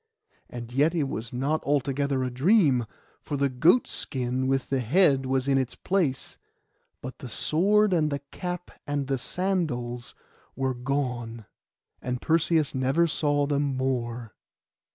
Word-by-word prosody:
And 120 -1 -8
yet 150 +6 +2
it 160 - +1
was 115 -2 -5
not 140 +5 -1
altogether 140 -1 0
a 125 - -2
dream; 135 - +3 0.3
for 145 - -4
the 140 0 +2
goat 160 - +4
skin 130 0 -2
with 135 0 -1
the 135 - +2
head 135 - +3
was 130 0 0
in 135 -1 +3
its 130 -1 -3
place; 170 -9 -1 0.6
but 130 +1 -7
the 130 - -8
sword, 200 - +2
and 155 -3 +2
the 140 - -1
cap, 180 -1 -5 0.2
and 145 -1 -1
the 135 -1 -1
sandals 130 -10 -2 0.4
were 130 -1 -1
gone, 125 -3 -3 0.6
and 125 -1 -3
Perseus 160 -1 +2
never 135 +5 +2
saw 145 -3 +1
them 140 -2 0
more. 120 -4 -2
135 Hz, 145 wpm, -26 LUFS, 125-155 Hz, 0.6 s, goat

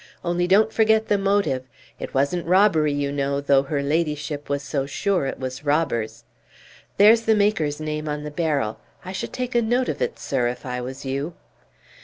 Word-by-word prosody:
Only 175 +1 0
don't 215 +4 +4
forget 220 0 +3
the 205 - +3
motive; 195 -9 +1 0.4
it - - -6
wasn't 150 +6 0
robbery, 180 -5 +4
you 145 0 -1
know, 140 0 -1
though 140 -1 +3
her 140 +1 -2
ladyship 150 -1 -2
was 140 0 -1
so 140 -1 -2
sure 180 +1 0
it - - -5
was 130 +1 -5
robbers! 120 -7 -1 0.7
There's 220 +3 +7
the 225 -1 +3
maker's 195 -8 +1
name 155 0 -3
on 150 0 -3
the 150 - -6
barrel. 145 -9 -1 0.3
I 185 - -5
should 190 - -5
take 250 0 -4
a 240 - +3
note 245 +3 +1
of - - -4
it, - - -1
sir, 125 -3 -1
if 125 0 -5
I 125 -1 -3
was 130 +3 -7
you!" 140 +5 -3
150 Hz, 190 wpm, -23 LUFS, 140-195 Hz, 0.7 s, There's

